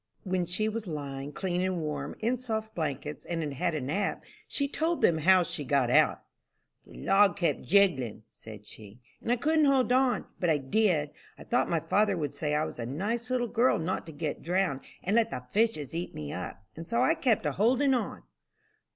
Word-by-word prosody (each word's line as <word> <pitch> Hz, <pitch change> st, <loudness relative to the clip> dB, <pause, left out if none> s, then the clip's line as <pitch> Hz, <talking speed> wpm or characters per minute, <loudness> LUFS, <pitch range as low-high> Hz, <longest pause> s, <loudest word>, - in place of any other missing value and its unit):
When 185 Hz, -2 st, -1 dB
she 200 Hz, +5 st, +1 dB
was 220 Hz, -1 st, -3 dB
lying, 140 Hz, -3 st, -5 dB
clean 180 Hz, +1 st, -2 dB
and 185 Hz, -1 st, 0 dB
warm, 150 Hz, -2 st, -4 dB
in 240 Hz, +3 st, 0 dB
soft 220 Hz, -3 st, -3 dB
blankets, 150 Hz, -2 st, -4 dB
and 165 Hz, -1 st, -3 dB
had 145 Hz, -2 st, -3 dB
had 170 Hz, +4 st, -1 dB
a 150 Hz, -, -2 dB
nap, 160 Hz, +10 st, -2 dB, 0.2 s
she 280 Hz, -, -1 dB
told 325 Hz, +4 st, -1 dB
them 160 Hz, -2 st, +4 dB
how 185 Hz, +3 st, +5 dB
she 150 Hz, -, -4 dB
got 135 Hz, -3 st, +1 dB
out. -, -, +4 dB, 0.6 s
"The -, -, -14 dB
log 195 Hz, -, +4 dB
kept 175 Hz, -, 0 dB
jiggling," 155 Hz, -, +2 dB
said 105 Hz, -2 st, -12 dB
she, 105 Hz, +1 st, -11 dB, 0.2 s
"and 235 Hz, -, -2 dB
I -, -, +5 dB
couldn't 310 Hz, +5 st, +2 dB
hold 265 Hz, -3 st, +3 dB
on, 255 Hz, 0 st, +2 dB
but 175 Hz, -, +1 dB
I 155 Hz, -, +4 dB
did. 150 Hz, +1 st, +1 dB, 0.3 s
I -, -, -11 dB
thought 245 Hz, -, +1 dB
my 165 Hz, -2 st, +1 dB
father 205 Hz, -2 st, +2 dB
would 145 Hz, -4 st, -3 dB
say 150 Hz, +1 st, -1 dB
I 155 Hz, +1 st, +1 dB
was -, -, -8 dB
a 115 Hz, -, -3 dB
nice 210 Hz, -, -3 dB
little 250 Hz, -1 st, +1 dB
girl 240 Hz, +3 st, +3 dB
not 170 Hz, +2 st, -3 dB
to -, -, -7 dB
get 150 Hz, 0 st, -4 dB
drowned, 175 Hz, -5 st, 0 dB, 0.2 s
and 200 Hz, +4 st, 0 dB
let 230 Hz, -1 st, +3 dB
the 125 Hz, -, -5 dB
fishes 210 Hz, -, +1 dB
eat 170 Hz, +2 st, -4 dB
me 75 Hz, -1 st, -5 dB
up, 90 Hz, +2 st, -6 dB
and 165 Hz, +1 st, -8 dB
so 235 Hz, +5 st, +1 dB
I 310 Hz, -, +4 dB
kept 245 Hz, -, +1 dB
a 150 Hz, -, +1 dB
holdin' 255 Hz, -, +3 dB
on." 245 Hz, -3 st, -2 dB
180 Hz, 210 wpm, -29 LUFS, 150-225 Hz, 0.6 s, how